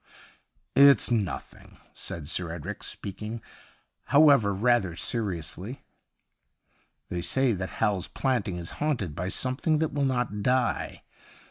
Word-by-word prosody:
' - - -45
It's 140 - +3
nothing,' 105 -6 -3 0.2
said 80 -4 -6
Sir 85 +1 -3
Edric, 85 +5 -6
speaking, 105 +3 -6 0.7
however, 140 -8 +6
rather 100 -3 +2
seriously. 95 - -3 0.6
' - - -44
They 90 - -2
say 130 +6 +2
that 95 -1 -3
Hal's 105 -5 +1
Planting 125 -9 -1
is 85 -1 -6
haunted 125 - 0
by 90 +3 -3
something 130 +8 0
that 160 0 -1
will 140 -1 +1
not 125 -6 -1
die. 125 +3 0
105 Hz, 125 wpm, -27 LUFS, 90-130 Hz, 0.7 s, however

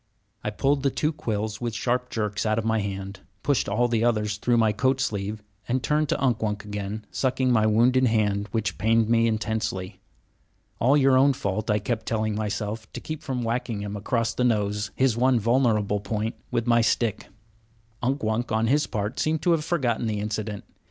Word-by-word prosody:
I - - -1
pulled 135 +6 +1
the 140 - +2
two 150 +4 -1
quills 110 -5 -3
with 120 -3 -2
sharp 125 +2 -1
jerks 105 -2 -2
out 110 -1 +1
of 115 - -1
my 110 0 +2
hand, 100 -1 -5 0.2
pushed 140 -7 +1
all 120 +5 +2
the 115 -1 +1
others 105 -3 +1
through 120 +3 +1
my 110 -2 +4
coat 130 +5 +1
sleeve, 105 -4 -2 0.2
and 125 +1 0
turned 150 -1 +1
to - - 0
Unk 125 -4 +1
Wunk 105 -1 -2
again, 105 +1 -5
sucking 130 -1 +1
my 110 -3 +4
wounded 125 +4 +4
hand, 105 -2 +1
which 105 -4 -2
pained 115 0 +3
me 115 0 +4
intensely. 110 -4 -2 0.8
"All 135 +5 +4
your 135 -2 +4
own 140 +1 +5
fault," 105 -2 -3
I 105 - +3
kept 110 +2 -3
telling 110 -1 0
myself, 105 +1 -3
to - - -5
keep 155 -1 -6
from 125 -3 -3
whacking 115 -2 -2
him 105 0 -5
across 115 +2 -1
the 125 - -1
nose, 105 -3 +1
his 130 -3 +2
one 125 0 +3
vulnerable 110 -3 +2
point, 105 +2 -2 0.2
with 115 - -1
my 120 -1 +4
stick. 115 -1 0 0.7
Unk 135 +2 -1
Wunk, 110 +2 -1
on 110 +1 +2
his 145 +5 +2
part, 105 0 -3
seemed 155 0 0
to 175 - +3
have 165 -2 +2
forgotten 125 -9 0
the 105 -1 -1
incident. 105 0 -3
110 Hz, 195 wpm, -25 LUFS, 105-125 Hz, 0.8 s, own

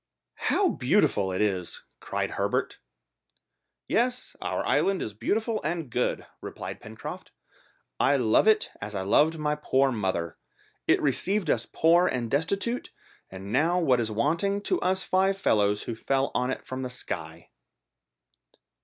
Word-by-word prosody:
"How 395 -3 +3
beautiful 125 - +2
it 95 - -1
is!" 95 -4 -1 0.2
cried - - -3
Herbert. - - -1 1.1
"Yes, 250 +2 0
our - - -2
island 195 -1 +2
is 105 - -4
beautiful 220 - -1
and 155 -3 -3
good," 125 +2 -1 0.2
replied - - -7
Pencroft. - - -8 0.7
"I 140 - +4
love 125 - +3
it 215 -1 +3
as 105 +1 -6
I 95 - -2
loved 150 +11 +3
my 150 -1 0
poor 135 -2 +1
mother. 95 -7 -2 0.5
It - - +4
received 180 +5 +2
us - - 0
poor 170 +2 +4
and 120 -3 -2
destitute, 195 - 0 0.4
and 95 +1 -8
now 170 +4 +3
what 130 -8 +3
is 115 -2 -1
wanting 165 - 0
to 355 - 0
us 190 +1 +1
five 190 +1 +2
fellows 105 - +2
who 115 - -4
fell 135 +4 0
on 125 +1 0
it 130 - -4
from 130 0 -5
the 130 - -3
sky." 125 - -7
140 Hz, 145 wpm, -27 LUFS, -, 1.1 s, I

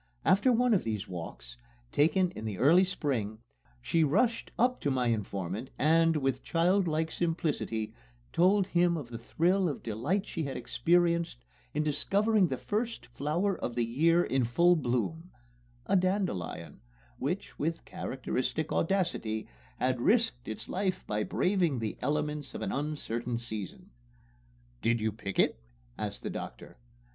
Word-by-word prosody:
After 205 +7 +5
one 245 0 +3
of 195 - +2
these 110 -3 -3
walks, 80 -9 -8 0.3
taken 170 +5 +3
in 110 - -8
the 105 -3 -3
early 165 - +6
spring, 130 - -1 0.5
she 165 -1 +2
rushed 225 - +2
up 250 +2 +2
to 145 - +1
my 125 -3 +1
informant 100 +1 -3
and, 165 +1 +4
with 135 -3 0
childlike 165 -2 +1
simplicity, 155 - -1 0.4
told 190 +3 +4
him 175 -1 +2
of 140 -6 -6
the 115 -1 -6
thrill 180 +9 +1
of 145 - -5
delight 135 - -1
she - - -4
had 140 -3 -3
experienced 170 0 +1 0.3
in 150 - +2
discovering 195 +7 +3
the 130 - -2
first 225 - -2
flower 155 +11 -1
of 120 - -4
the 120 -1 +1
year 165 +9 +3
in 130 -4 +1
full 170 +10 +4
bloom 155 - -1 0.6
a - - +2
dandelion, 180 - -1 0.4
which, 180 +9 -3
with 165 +2 -2
characteristic 135 -4 -3
audacity, 165 - 0 0.3
had 125 -1 0
risked 225 - +2
its 110 - -5
life 190 0 -1
by 105 0 -1
braving 180 - +1
the 110 -3 -3
elements 150 -1 -2
of - - -4
an - - -2
uncertain 125 -5 -2
season. 110 -5 -7 0.9
"Did 115 0 +2
you 110 0 0
pick 100 -2 -6
it?" - - +2 0.3
asked - - -5
the - - -3
doctor. - - -8
150 Hz, 145 wpm, -30 LUFS, 120-180 Hz, 0.9 s, early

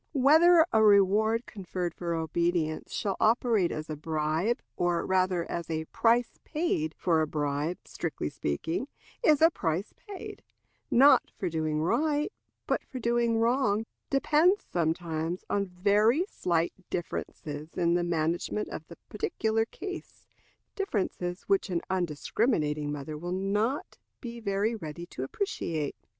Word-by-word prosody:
Whether 320 +5 +6
a 220 - +5
reward 215 +3 +4
conferred 180 -3 -4
for 170 -1 -3
obedience 165 0 -1
shall 200 -3 -1
operate 225 -5 +3
as 155 +1 -4
a 155 - -4
bribe, 155 +8 0 0.2
or 175 -1 0
rather 185 -2 +1
as 170 -1 -5
a 160 -1 -2
price 235 +7 +1
paid 300 - -1
for 165 -3 +2
a 155 - +1
bribe, 150 +3 -1
strictly - - -4
speaking, 75 - -2 0.4
is 305 -7 +5
a 330 - +7
price 170 - -2
paid, 405 -3 -9 0.5
not 275 +4 +6
for 185 - -2
doing 155 -1 -1
right, 295 - +1 0.3
but - - 0
for 265 - -9
doing 235 -1 +1
wrong 225 -2 +2 0.2
depends 310 +8 +3
sometimes 165 0 -2
on 200 -1 +1
very 205 - +3
slight 170 - 0 0.2
differences 155 -3 -5
in 170 -1 +2
the 175 0 +2
management 170 +4 -1
of 155 - -7
the 170 - -12
particular 220 +1 0
case 375 +10 -8 0.5
differences 190 - -2
which 395 - +1
an 175 -2 0
undiscriminating 155 - 0
mother 150 +1 -5
will 175 +2 -5
not 205 +8 -1 0.2
be 235 -2 -7
very 205 +1 0
ready 170 -5 -6
to 150 - -8
appreciate. 155 - -2
185 Hz, 135 wpm, -29 LUFS, 160-235 Hz, 0.5 s, a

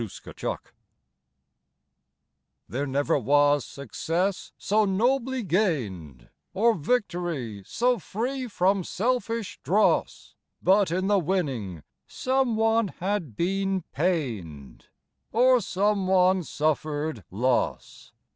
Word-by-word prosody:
SUN 115 - -4 0.3
SHADOWS - - -3 2.1
There 140 +4 -3
never 145 +3 +1
was 145 +2 +3
success 170 - -3
so 215 +2 +2
nobly 245 +5 +1
gained, 110 - -1 0.3
Or 230 +4 +4
victory 170 - -2
so 245 0 +1
free 250 - -3
from 195 -2 +1
selfish 230 +1 -2
dross, 210 +4 +1 0.3
But 195 0 +3
in 185 +3 -1
the 200 0 +3
winning 135 - -2 0.2
some 260 -2 0
one 225 0 +3
had 185 - -3
been 195 - 0
pained 110 - -3 0.4
Or 250 +2 +4
some 200 0 0
one 185 0 +4
suffered 155 - -2
loss. 120 +6 -1
185 Hz, 100 wpm, -26 LUFS, 145-210 Hz, 2.1 s, Or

